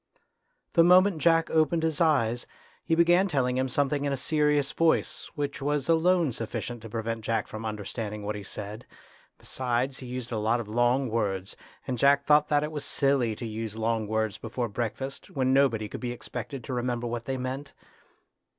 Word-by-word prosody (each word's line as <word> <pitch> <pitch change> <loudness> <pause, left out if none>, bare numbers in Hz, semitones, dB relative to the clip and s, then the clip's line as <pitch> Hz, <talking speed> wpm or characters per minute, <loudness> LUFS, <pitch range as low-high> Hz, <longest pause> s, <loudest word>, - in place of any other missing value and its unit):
The 165 - +6
moment 180 0 +5
Jack 165 0 +3
opened 160 +1 +2
his 160 0 0
eyes, 120 -7 +2 0.4
he 165 - +1
began 175 +3 +4
telling 130 -7 0
him 130 0 0
something 145 +2 0
in 140 - 0
a 140 - -1
serious 150 0 +1
voice, 165 +1 +1
which 145 -1 -3
was 145 -1 0
alone 165 -1 +3
sufficient 115 +1 -5
to 115 - -9
prevent 115 0 -3
Jack 110 -1 0
from 110 +1 -6
understanding 105 0 -5
what 105 +1 -2
he 105 - -6
said. 105 +3 -7 0.5
Besides, 130 +1 -2
he 130 - -8
used 125 0 -5
a 110 - -1
lot 110 +3 +1
of 115 - -5
long 120 +4 +2
words, 100 -4 -2 0.3
and 125 -2 -3
Jack 140 +1 +4
thought 150 0 +5
that 145 -1 +2
it 150 - -3
was 150 -2 -4
silly 135 -5 +1
to 120 - -6
use 110 -1 -5
long 110 -1 -1
words 110 -1 -1
before 120 +2 -3
breakfast, 120 +5 -4
when 130 -1 +1
nobody 125 -6 +3
could - - -8
be 125 -1 -2
expected 125 +2 -6
to 130 - -5
remember 120 -1 -1
what 120 0 -4
they 135 0 -2
meant. 130 +3 -4
125 Hz, 185 wpm, -27 LUFS, 115-145 Hz, 0.5 s, The